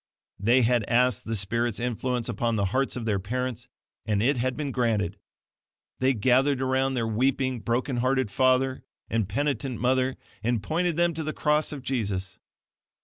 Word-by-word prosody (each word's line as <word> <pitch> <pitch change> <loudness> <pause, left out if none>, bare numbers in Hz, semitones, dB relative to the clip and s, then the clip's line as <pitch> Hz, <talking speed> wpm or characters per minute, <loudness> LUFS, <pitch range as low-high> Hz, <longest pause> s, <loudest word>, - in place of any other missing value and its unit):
They 120 +6 +4
had 120 -1 +3
asked 125 -1 +2
the 115 - -2
Spirit's 115 +3 -1
influence 125 0 -1
upon 115 0 -1
the 100 -2 +1
hearts 135 +1 +1
of 120 -3 -4
their 105 -3 +1
parents, 125 +4 -3 0.4
and 105 -2 0
it 130 +7 +3
had 125 +1 -1
been 145 -2 -2
granted. 105 -6 0 0.8
They 130 0 +2
gathered 130 +5 +3
around 130 0 +1
their 120 -2 0
weeping, 130 +3 0
broken 125 +3 -1
hearted 130 -2 +1
father 130 +1 +2 0.3
and 110 -4 0
penitent 135 +1 -1
mother, 130 +2 +1 0.2
and 115 -1 0
pointed 170 +6 0
them 175 0 +3
to 160 0 -4
the 155 0 -3
cross 150 0 +1
of 140 -4 -7
Jesus. 100 -8 -2
125 Hz, 165 wpm, -26 LUFS, 115-130 Hz, 0.8 s, They